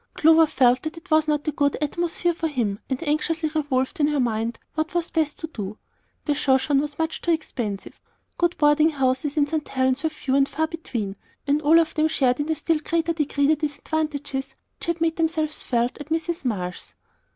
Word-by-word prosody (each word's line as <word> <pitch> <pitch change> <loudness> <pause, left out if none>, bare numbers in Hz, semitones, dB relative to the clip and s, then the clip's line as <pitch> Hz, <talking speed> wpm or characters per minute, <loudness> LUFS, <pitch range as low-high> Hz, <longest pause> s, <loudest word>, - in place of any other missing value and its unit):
Clover 320 +1 +6
felt 255 -3 +3
that 315 +2 -5
it 340 +1 -13
was 310 0 +4
not 300 0 0
a - - +2
good 285 -1 +1
atmosphere 345 +3 0
for 330 -1 -2
him, 230 -9 -1
and 265 +4 -3
anxiously 310 +1 0
revolved 290 +1 -1
in 290 - +4
her 295 -1 0
mind 230 -1 0 0.2
what 315 +2 -2
was 345 -1 0
best 310 -2 0
to - - -5
do. 215 -8 -6 0.5
The 295 - +2
Shoshone 275 0 +2
was 295 0 -5
much 320 0 -2
too - - -3
expensive; 240 - -3 0.4
good 345 0 +1
boarding 300 +1 +5
houses 270 0 0
in 290 - +4
St. 300 0 -3
Helen's 260 0 +1
were 320 - +1
few 305 -3 -3
and 275 0 +3
far 315 - 0
between, 235 -12 -5 0.3
and 290 +1 +2
all 310 +2 +6
of 325 -1 +1
them 310 0 +2
shared 260 -5 +1
in 290 +2 -2
a - - +1
still 320 +1 0
greater 335 +2 0
degree 290 -2 0
the 310 +2 +4
disadvantages 290 -2 -3 0.2
which - - -6
had 340 -1 -1
made 325 -1 +1
themselves 315 -2 0
felt 240 +2 -1
at 295 - -9
Mrs. 325 -1 -2
Marsh's. 180 -7 -4
300 Hz, 205 wpm, -24 LUFS, 265-320 Hz, 0.5 s, Clover